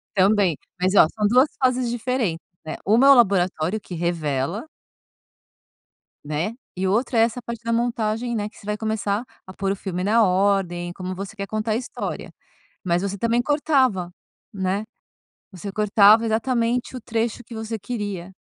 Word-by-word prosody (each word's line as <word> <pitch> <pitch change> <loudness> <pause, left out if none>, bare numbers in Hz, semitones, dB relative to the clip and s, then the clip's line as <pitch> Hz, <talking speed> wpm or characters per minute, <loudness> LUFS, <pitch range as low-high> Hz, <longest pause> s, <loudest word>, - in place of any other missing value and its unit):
Também, 195 -4 +3 0.2
mas 185 +2 +2
ó, - - +8
são 210 -1 +1
2 250 +6 +5
fases 255 -1 +2
diferentes, 235 -8 -2 0.2
neh. 155 - -5
1 230 +7 +5
é - - +8
o - - +11
laboratório 190 - +2
que 195 - -10
revela 165 - -2 1.6
né, 155 +8 -2 0.2
e 190 +1 -1
o - - +1
outro 235 +4 0
é - - +6
essa 230 +2 +1
parte 235 0 -7
da 230 - -2
montagem, 235 0 -1
né, 210 -1 -2
que - - -21
você - - -15
vai 210 0 -2
começar 220 -1 -1 0.2
a 185 - -10
pôr 195 0 -1
o - - -1
filme 185 -2 -4
na 220 +4 +4
ordem, 185 -2 +1
como 185 0 -5
você 195 +3 -7
quer 200 -1 -5
contar 215 +1 -2
a - - +2
história, 245 +2 -5 0.5
mas 175 -1 +1
você 200 0 -3
também 230 +3 +1
cortava, 260 - +1 0.4
né, 190 +1 -1 0.7
você 195 +2 -7
cortava 210 +1 +5
exatamente 235 +2 0
o - - -6
trecho 230 0 -2
que 235 - -11
você 220 0 -4
queria, 200 -4 -5
210 Hz, 170 wpm, -23 LUFS, 185-235 Hz, 1.6 s, o